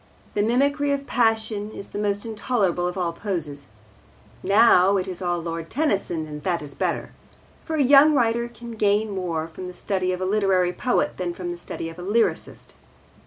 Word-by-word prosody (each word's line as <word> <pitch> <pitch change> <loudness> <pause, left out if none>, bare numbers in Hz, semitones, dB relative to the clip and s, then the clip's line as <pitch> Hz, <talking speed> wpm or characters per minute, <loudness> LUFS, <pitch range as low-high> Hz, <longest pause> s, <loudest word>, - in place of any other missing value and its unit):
The 205 - +1
mimicry 280 +6 +2
of 280 0 -3
passion 220 -4 0
is 200 - -9
the 205 - -5
most 205 0 -1
intolerable 205 -5 0
of 180 - -4
all 175 -2 -1
poses. 160 -7 -4 0.7
Now, 200 -2 +5
it 185 - -2
is 185 0 -6
all 175 -1 0
Lord 165 0 -5
Tennyson, 200 - -1
and 150 -1 -8
that 170 -1 -1
is 140 -1 -7
better. - - -2 0.5
For 320 - -2
a 295 - +3
young 285 +3 +7
writer 235 -2 +2
can 235 0 -10
gain 210 -1 +1
more 170 -5 -2
from 180 +3 -8
the 180 - -9
study 185 -2 -1
of 180 - -3
a 185 - -1
literary 190 -3 +2
poet 245 +7 0
than 175 -2 -3
from 175 -1 -4
the - - -4
study 165 - -6
of 165 +2 -9
a - - -6
lyrist. 210 +6 -1
195 Hz, 190 wpm, -24 LUFS, 175-230 Hz, 0.7 s, young